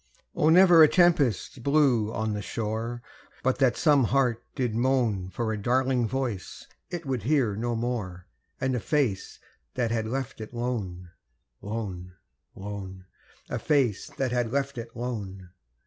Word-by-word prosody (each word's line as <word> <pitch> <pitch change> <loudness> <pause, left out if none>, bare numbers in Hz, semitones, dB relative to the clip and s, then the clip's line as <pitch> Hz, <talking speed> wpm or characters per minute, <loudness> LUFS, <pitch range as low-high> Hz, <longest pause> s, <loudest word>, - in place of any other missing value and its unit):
Oh! 155 - +3
never 175 0 +7
a 155 - +10
tempest 150 - +2
blew 130 -6 +3
on 110 -1 -2
the 105 - -3
shore 115 +3 -4 0.4
But 130 0 +1
that 130 -3 +3
some 145 -5 +4
heart 120 -1 +1
did 125 -5 -1
moan 115 -6 +1
For 110 +2 -2
a 105 - -4
darling 125 +1 +1
voice 120 -5 -4 0.2
it 170 -2 -5
would 130 -4 -2
hear 125 -3 +1
no 120 +2 -2
more 110 -7 -3 0.3
And 130 0 0
a - - 0
face 125 -4 -1 0.4
that 115 -2 0
had 110 -1 -1
left 130 -1 -4
it 110 +2 -8
lone, 100 -8 -4 0.5
lone, 95 -4 -5 0.4
lone 95 -2 -7 0.4
A - - -3
face 135 -9 +1
that 130 -2 0
had 120 -2 0
left 140 -1 -1
it 115 0 -7
lone! 100 -7 -5
120 Hz, 150 wpm, -27 LUFS, 105-135 Hz, 0.5 s, a